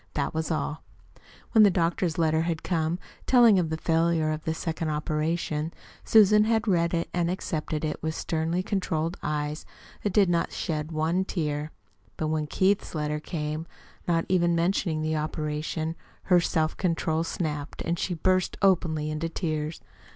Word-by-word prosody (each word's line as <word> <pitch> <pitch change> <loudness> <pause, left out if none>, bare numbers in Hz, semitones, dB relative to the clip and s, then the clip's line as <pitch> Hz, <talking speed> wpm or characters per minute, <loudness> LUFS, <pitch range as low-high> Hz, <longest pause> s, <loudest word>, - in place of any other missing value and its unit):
That - - -1
was 160 0 -2
all. 155 -1 -2 0.7
When 220 - +6
the 205 - +7
doctor's 170 -1 0
letter 160 -1 +2
had 165 -1 -2
come, 165 -1 0 0.3
telling 235 -6 +6
of 165 -3 0
the 160 - -2
failure 165 -1 +1
of 155 0 -4
the 160 - 0
second 160 -1 -3
operation, 155 +1 -1 0.3
Susan 210 -1 +6
had 225 0 +1
read 170 -3 +2
it 170 - -1
and 175 -1 +1
accepted 160 -4 -2
it 150 - -3
with 160 0 -2
sternly 165 +2 -1
controlled 175 -4 -1
eyes 150 0 -2 0.4
that 205 - -1
did 200 0 +4
not 170 -1 +1
shed 155 -1 -3
one 160 +4 +1
tear. 150 -5 -2 0.5
But 155 - -1
when 155 -1 -1
Keith's 190 +3 +1
letter 150 0 -1
came, 155 0 -4 0.4
not 165 -1 +2
even 175 -2 +2
mentioning 170 -2 0
the 155 0 0
operation, 155 +1 -2 0.3
her 180 -2 +5
self 160 -2 0
control 165 -2 0
snapped, 150 -3 -4
and 170 0 -1
she 180 - -1
burst 185 +3 +1
openly 160 -5 +2
into 155 +2 -2
tears. 155 -2 -3
165 Hz, 160 wpm, -27 LUFS, 155-175 Hz, 0.7 s, the